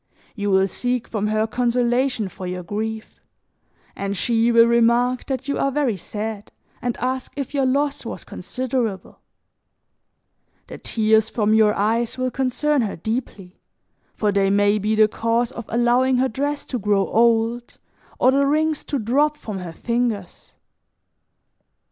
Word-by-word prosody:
You 205 Hz, -2 st, -3 dB
will 190 Hz, 0 st, +3 dB
seek 245 Hz, +4 st, -2 dB
from 210 Hz, -2 st, -2 dB
her 215 Hz, +1 st, +1 dB
consolation 245 Hz, 0 st, 0 dB
for 185 Hz, 0 st, -8 dB
your 180 Hz, 0 st, -4 dB
grief, 220 Hz, +4 st, -5 dB, 0.7 s
and 200 Hz, 0 st, -3 dB
she 230 Hz, +2 st, +2 dB
will 230 Hz, 0 st, +7 dB
remark 235 Hz, +2 st, +2 dB
that 265 Hz, 0 st, -3 dB
you 280 Hz, -, -1 dB
are 275 Hz, -, +1 dB
very 270 Hz, -5 st, 0 dB
sad 210 Hz, +3 st, -6 dB, 0.3 s
and 245 Hz, -2 st, -2 dB
ask 255 Hz, +1 st, -3 dB
if 280 Hz, -1 st, -5 dB
your 275 Hz, -2 st, +1 dB
loss 285 Hz, +2 st, 0 dB
was -, -, -7 dB
considerable; 250 Hz, -6 st, -4 dB, 1.5 s
the -, -, -10 dB
tears 220 Hz, 0 st, +2 dB
from 215 Hz, -2 st, +1 dB
your 215 Hz, -1 st, +4 dB
eyes 225 Hz, +4 st, 0 dB
will 255 Hz, 0 st, -1 dB
concern 270 Hz, +3 st, 0 dB
her 215 Hz, -4 st, -2 dB
deeply, 205 Hz, -2 st, -5 dB, 0.5 s
for 210 Hz, -1 st, +1 dB
they 195 Hz, -1 st, +2 dB
may 205 Hz, +1 st, +3 dB
be 215 Hz, +2 st, 0 dB
the 215 Hz, 0 st, +5 dB
cause 230 Hz, +2 st, 0 dB
of 235 Hz, -, -8 dB
allowing 245 Hz, +2 st, +2 dB
her 260 Hz, +1 st, +2 dB
dress 285 Hz, +4 st, -3 dB
to 250 Hz, -, -3 dB
grow 200 Hz, -1 st, +2 dB
old 230 Hz, +1 st, +1 dB, 0.4 s
or 255 Hz, -, +4 dB
the 275 Hz, +1 st, +2 dB
rings 310 Hz, +1 st, +1 dB
to 290 Hz, -, -2 dB
drop 285 Hz, +6 st, +1 dB
from 210 Hz, -8 st, -6 dB
her 180 Hz, -2 st, -6 dB
fingers. 235 Hz, -3 st, -3 dB
235 Hz, 150 wpm, -22 LUFS, 210-255 Hz, 1.5 s, will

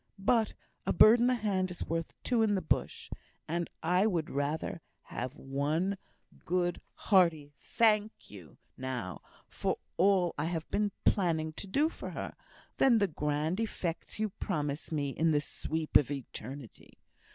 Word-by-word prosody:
"But 220 Hz, +3 st, +2 dB, 0.3 s
'a -, -, +2 dB
bird 230 Hz, +2 st, +8 dB
in 240 Hz, -, +4 dB
the 255 Hz, -, +3 dB
hand 195 Hz, -5 st, 0 dB
is 180 Hz, -, -5 dB
worth 165 Hz, 0 st, -2 dB
two 240 Hz, -2 st, +2 dB
in 215 Hz, -2 st, +3 dB
the 190 Hz, -, 0 dB
bush;' -, -, -1 dB, 0.4 s
and 170 Hz, +1 st, -2 dB
I 180 Hz, +5 st, +3 dB
would 170 Hz, -7 st, -1 dB
rather 145 Hz, +4 st, -2 dB, 0.2 s
have 125 Hz, +1 st, -5 dB
had -, -, -17 dB
one 150 Hz, +8 st, 0 dB, 0.5 s
good, 175 Hz, 0 st, 0 dB
hearty 165 Hz, -7 st, +3 dB
'Thank 215 Hz, -1 st, +1 dB
you,' 90 Hz, -8 st, -12 dB, 0.2 s
now, 125 Hz, -9 st, -4 dB, 0.3 s
for -, -, -2 dB, 0.2 s
all 185 Hz, -2 st, +4 dB
I 150 Hz, -, 0 dB
have 165 Hz, -1 st, -3 dB
been 205 Hz, 0 st, +1 dB
planning 160 Hz, -5 st, +2 dB
to 200 Hz, -, -7 dB
do 285 Hz, +11 st, +2 dB
for -, -, -7 dB
her, -, -, -5 dB, 0.4 s
than 250 Hz, -4 st, +5 dB
the 205 Hz, -2 st, +3 dB
grand 150 Hz, +4 st, -1 dB
effects 180 Hz, -7 st, -3 dB
you 215 Hz, 0 st, 0 dB
promise 150 Hz, -7 st, -3 dB
me 145 Hz, -3 st, -1 dB
in 165 Hz, +4 st, +1 dB
the 150 Hz, -2 st, +3 dB
'sweep 155 Hz, +1 st, -4 dB
of 140 Hz, -, +6 dB
eternity.' 135 Hz, -2 st, -8 dB
170 Hz, 160 wpm, -31 LUFS, 145-200 Hz, 0.5 s, bird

